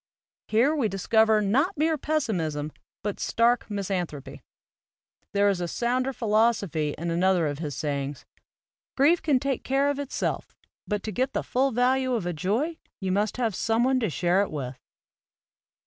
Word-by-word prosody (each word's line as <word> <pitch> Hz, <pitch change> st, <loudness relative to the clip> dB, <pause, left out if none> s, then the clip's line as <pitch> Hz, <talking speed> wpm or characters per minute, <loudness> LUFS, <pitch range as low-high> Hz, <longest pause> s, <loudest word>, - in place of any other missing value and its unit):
Here 245 Hz, +8 st, +3 dB
we 270 Hz, -7 st, +1 dB
discover 215 Hz, +2 st, +3 dB
not 275 Hz, -, +1 dB
mere 315 Hz, +2 st, +2 dB
pessimism 180 Hz, -, -1 dB, 0.3 s
but 205 Hz, -1 st, -3 dB
stark 235 Hz, +1 st, +2 dB
mis 200 Hz, -1 st, -3 dB
anthropy. 170 Hz, -7 st, -4 dB, 0.9 s
There 200 Hz, 0 st, +3 dB
is 195 Hz, -3 st, +1 dB
a 175 Hz, -, -1 dB
sounder 250 Hz, +7 st, 0 dB
philosophy 210 Hz, -, +1 dB
in 170 Hz, +2 st, -3 dB
another 180 Hz, 0 st, +2 dB
of 145 Hz, -1 st, -3 dB
his 150 Hz, -5 st, -4 dB
sayings: 140 Hz, -3 st, -3 dB, 0.7 s
"Grief 305 Hz, +6 st, +4 dB
can 285 Hz, -5 st, +2 dB
take 275 Hz, -1 st, -2 dB
care 275 Hz, +2 st, +2 dB
of 285 Hz, -, -4 dB
itself, 285 Hz, -1 st, -3 dB, 0.3 s
but 210 Hz, -1 st, -2 dB
to 215 Hz, -, -3 dB
get 255 Hz, +6 st, -1 dB
the -, -, -1 dB
full 265 Hz, +2 st, +1 dB
value 255 Hz, +1 st, +2 dB
of 215 Hz, -7 st, -2 dB
a 175 Hz, -, -1 dB
joy 225 Hz, -, -1 dB, 0.2 s
you 190 Hz, -2 st, -2 dB
must 205 Hz, +4 st, 0 dB
have 230 Hz, -4 st, 0 dB
some 225 Hz, +4 st, +1 dB
one 260 Hz, 0 st, +3 dB
to 225 Hz, -, 0 dB
share 175 Hz, +4 st, +2 dB
it 200 Hz, -, -1 dB
with." 135 Hz, -4 st, -5 dB
215 Hz, 165 wpm, -26 LUFS, 175-260 Hz, 0.9 s, Grief